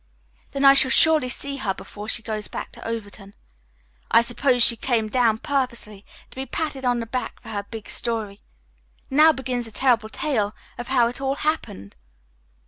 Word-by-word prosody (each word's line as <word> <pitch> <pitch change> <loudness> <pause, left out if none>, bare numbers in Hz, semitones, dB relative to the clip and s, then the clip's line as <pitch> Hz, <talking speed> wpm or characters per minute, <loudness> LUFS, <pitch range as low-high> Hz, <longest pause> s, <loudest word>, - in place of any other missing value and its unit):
"Then 275 +1 -1
I 275 - +9
shall 270 -1 +5
surely 310 -2 +5
see 280 +2 -1
her 200 -8 -2
before 210 +2 -9
she 225 - -1
goes 215 -2 -4
back - - -7
to - - -10
Overton. 205 -3 -7 0.7
I 230 - +5
suppose 245 +1 +3
she 235 - +7
came 230 -2 -1
down 230 -2 +2
purposely 235 -6 -3 0.2
to - - -16
be 265 +1 -5
patted 285 0 -4
on 245 -1 +1
the 230 - -4
back 240 0 -5
for - - -13
her 205 -2 -5
big 225 -2 -8
story. 220 -4 -3 0.7
Now 305 +4 +6
begin 255 -3 -3
the 230 - -5
terrible 230 -1 +1
tale 220 -6 -2 0.2
of 240 - -6
how 250 -3 +3
it 245 +3 -6
all 270 0 -1
happened." 280 - -3
240 Hz, 180 wpm, -23 LUFS, 220-270 Hz, 0.7 s, I